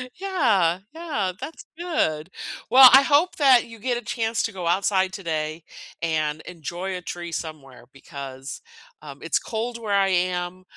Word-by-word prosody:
Yeah, 235 - +1
yeah, 295 - -3
that's 320 - -8
good. 185 - -1 0.4
Well, 255 +2 +10
I 270 +1 +9
hope 295 +6 +3
that 265 -5 +5
you 230 -1 -12
get 245 +2 -1
a - - -5
chance 225 +1 -1
to 225 - -2
go 185 -4 -6
outside 190 +1 +1
today 155 -3 -3 0.4
and 155 -2 -1
enjoy 180 +3 -5
a - - -8
tree 175 0 -6
somewhere 150 -7 -7
because, 135 -1 -8 0.4
um, 140 -2 -10
it's 165 - 0
cold 230 +2 -4
where 215 -3 -3
I 195 -1 +3
am, 180 0 -1
185 Hz, 155 wpm, -24 LUFS, 160-235 Hz, 0.4 s, Well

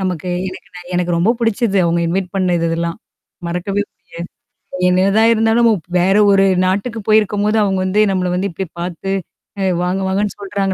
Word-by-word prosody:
நமக்கு 185 -2 -3 0.2
எனக்கு 185 - -11
ந - - -8 0.2
எனக்கு 175 0 0
ரொம்ப 180 +7 +2
பிடிச்சது 225 -2 0
அவவுங்க 170 0 +1
இன்வைட் 185 +1 -1
பண்ண 185 -2 +1
இது 165 - 0
இதெல்லாம். 170 +3 -2 0.5
மறக்கவே 180 +4 -2
முடியாது. - - -44 1.0
என்னதா 195 +4 +3
இருந்தாலும் 225 +1 +3
நம 215 -5 +1 0.2
வேற 190 +3 +3 0.2
ஒரு 195 0 +4 0.2
நாட்டுக்கு 205 +5 -1
போயிருக்கும்போது 215 0 +2
அவங்க 190 -2 0
வந்து 205 +3 +2
நம்மள 185 -1 0
வந்து 190 +2 -1
இப்டி 190 +3 -4
பார்த்து, 180 +2 -4 0.7
வாங்க 185 +2 -1
வாங்கன்னு 200 +2 -1
சொல்றாங்க. 195 -1 -2
195 Hz, 160 wpm, -17 LUFS, 180-205 Hz, 1.0 s, ஒரு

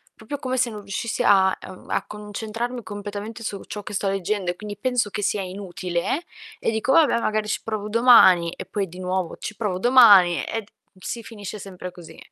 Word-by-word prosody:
proprio 240 +6 -6
come 260 -2 -2
se 250 -1 +2
non 210 -2 -7
riuscissi 205 +4 -3
a 190 -2 +5
uhm, 185 - -12
a - - -1
concentrarmi 220 +3 -5
completamente 205 +3 -7
su 200 -2 -4
ciò 205 -1 -7
che - - -8
sto 195 0 -1
leggendo 195 -1 -1
e - - -8
quindi 205 -1 -8
penso 250 -2 0
che 205 - -4
sia 205 0 0
inutile 185 - -3 0.4
e - - 0
dico: 225 +4 0
"Vabbè, 290 -8 +5
magari 215 -1 -1
ci - - 0
provo 215 -1 -4
domani" 210 -8 +6
e - - -7
poi 200 -2 -2
di 180 +2 -11
nuovo, 185 -1 -2
ci 215 - -6
provo 205 -5 -1
domani 205 -8 +7
e 225 - -3
d 205 - -20 0.4
si 235 -2 -5
finisce 210 -2 -8
sempre 185 -2 -8
così. 175 -2 -13
205 Hz, 200 wpm, -23 LUFS, 190-225 Hz, 0.4 s, domani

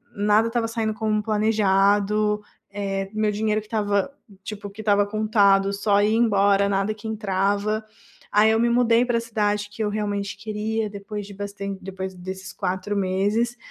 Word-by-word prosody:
nada 210 +2 +3
estava 230 -1 0
saindo 225 -1 -2
como 215 -1 -1
planejado. 210 0 +2 0.4
Eh, 195 -1 -2
meu 215 -1 +1
dinheiro 215 +1 0
que 210 - -17
estava, 205 +2 0 0.3
tipo, 205 0 -7
que 205 +2 -9
estava 205 -1 +3
contado, 205 -2 +3
só 200 0 +2
ia 210 - +3
embora, 200 -3 +3
nada 195 +2 0
que 215 +1 -9
entrava. 205 0 0 0.5
Aí 210 +1 +5
eu 225 - +2
me 235 - +3
mudei 235 0 +3
para 240 -1 +1
a - - -1
cidade 210 -2 -1
que 220 - -7
eu - - 0
realmente 205 -1 -2
queria, 215 0 -2
depois 205 0 -6
de 200 - -10
bastan 200 0 -5
depois 190 0 -6
desses 190 +1 -7
4 190 +1 -3
meses, 205 +5 0
210 Hz, 165 wpm, -23 LUFS, 200-220 Hz, 0.5 s, Aí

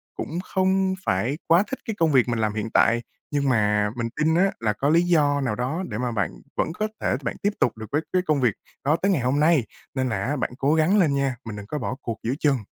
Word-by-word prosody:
cũng 165 - -4
không 190 0 +1
phải 115 +11 0
quá 170 +4 +5
thích 265 - -5
cái 220 - -3
công 160 -2 +3
việc 130 -3 +4
mình 115 -1 -1
làm 110 -1 0
hiện 110 +1 -3
tại, 115 +1 +4 0.3
nhưng 140 -2 +1
mà 105 -3 +2
mình 115 -1 -2
tin 160 +2 +2
á 195 +2 +3
là 110 -2 0
có 140 +7 0
lý 165 +2 +5
do 150 -5 +2
nào 120 -6 -1
đó 135 - -2
để 105 - -4
mà 125 0 -1
bạn 105 -3 -1 0.3
vẫn 160 - 0
có 215 +3 -1
thể - - +1
bạn 115 - -2
tiếp 205 +1 +2
tục 120 - +1
được 110 - -6
với 150 - +1
cái 185 - +3
công 150 -3 +2
việc 120 -5 +3 0.3
đó 150 +3 +4
tới 195 +1 +3
ngày 155 -9 +1
hôm 130 +4 +1
nay. 155 -5 +4 0.3
Nên 130 -1 0
là 115 - -1
á 145 +4 -1
bạn 125 - -2
cố 140 +3 +2
gắng 160 +6 +3
lên 155 -6 +3
nha, 135 -2 0
mình 110 - -6
đừng 105 -1 -8
có 150 - -3
bỏ 125 +1 -3
cuộc 115 -2 -4
giữa 120 +3 0
chừng! 145 -3 +3
140 Hz, 270 wpm, -24 LUFS, 115-160 Hz, 0.3 s, quá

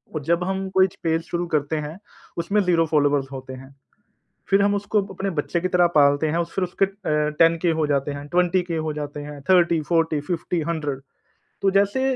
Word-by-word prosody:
और 155 - -2
जब 170 +4 +1
हम 190 +1 -2
कोई 190 0 +4
च 185 - -17
पेज 165 -1 +1
शुरू 175 +1 -3
करते 155 -1 -1
हैं, 150 +2 -5 0.4
उसमें 185 +5 0
ज़ीरो 170 -3 +2
फॉलोवर्स 145 -3 +1
होते 130 -1 -8
हैं, 130 +1 -12 0.8
फिर 195 +1 +4
हम 205 0 +2
उसको 205 +1 0
अपने 195 +2 -2
बच्चे 170 +1 -2
की 185 - -1
तरह 180 -1 +4
पालते 145 0 +4
हैं 165 +3 0
फिर 180 +3 -3
उसके 180 +2 0
अ, 195 - -3 0.5
10 165 0 +5
के 175 - +3
हो 155 - +2
जाते 140 0 0
हैं, 140 0 -7
20 180 +2 +2
के 170 -2 -4
हो 155 -1 -2
जाते 150 -1 -6
हैं, 145 0 -8
30-40-50-100 165 -3 0 0.6
तो 195 - +3
जैसे 200 +6 +2
165 Hz, 190 wpm, -23 LUFS, 150-180 Hz, 0.8 s, 10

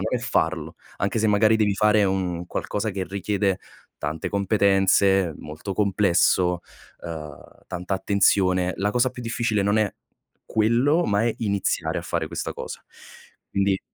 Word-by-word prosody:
non 125 - -1
è - - -11
farlo, 80 -9 -1 0.2
anche 100 +4 0
se 110 - +2
magari 110 +1 +4
devi 105 -2 +2
fare 105 +1 +3
un 90 -3 -1
qualcosa 105 +4 -3
che 95 -1 -3
richiede 100 0 -1 0.4
tante 75 +2 -4
competenze, 95 -2 +3
molto 75 +6 -7
complesso, 90 -3 +2 0.4
uhm, 75 -4 -9
tanta 90 +2 -3
attenzione, 95 -2 +2
la 105 +2 0
cosa 125 +3 +2
più 125 0 -9
difficile 115 -3 0
non 100 +2 +2
è, 105 -2 +2 0.6
quello, 120 +10 +3
ma 105 -1 +1
è 115 - +1
iniziare 100 -3 -1
a - - -6
fare - - -2
questa - - -4
cosa. - - -7 0.7
Quindi 100 -1 +1
100 Hz, 145 wpm, -24 LUFS, 90-105 Hz, 0.7 s, magari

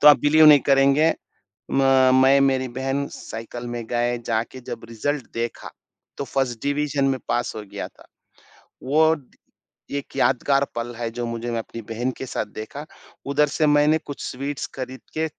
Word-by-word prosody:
तो 150 - +8
आप 150 - +8
बिलीव 155 +2 +6
नहीं 150 -2 +9
करेंगे 140 +4 +5 0.6
म 135 -1 +4
मैं 130 +1 +6
मेरी 135 -1 +2
बहन 135 +3 -2
साइकिल 115 +2 -7
में 120 -1 -4
गए। 120 +1 0
जाके 115 +3 -2
जब 120 -2 -7
रिजल्ट 130 +4 -2
देखा 115 0 -4 0.5
तो - - -2
फर्स्ट 130 -4 -2
डिवीजन 145 0 0
में 135 -1 0
पास 120 - 0
हो 105 - -5
गया - - -4
था। - - -21 0.8
वो 155 +4 +4 0.8
एक 140 - -5
यादगार 140 +2 +3
पल 120 +1 -4
है 115 -1 -2
जो 120 +1 -4
मुझे 115 0 -4
मैं 115 - -1
अपनी 115 +1 -7
बहन 120 +3 -1
के - - -5
साथ 125 - -3
देखा, 125 +7 -7 0.4
उधर 145 +2 +2
से 155 +1 +1
मैंने 150 +1 +4
कुछ 145 - -7
स्वीट्स 140 +2 -4
खरीद 130 0 -6 0.2
के 160 - +1
130 Hz, 170 wpm, -23 LUFS, 120-145 Hz, 0.8 s, नहीं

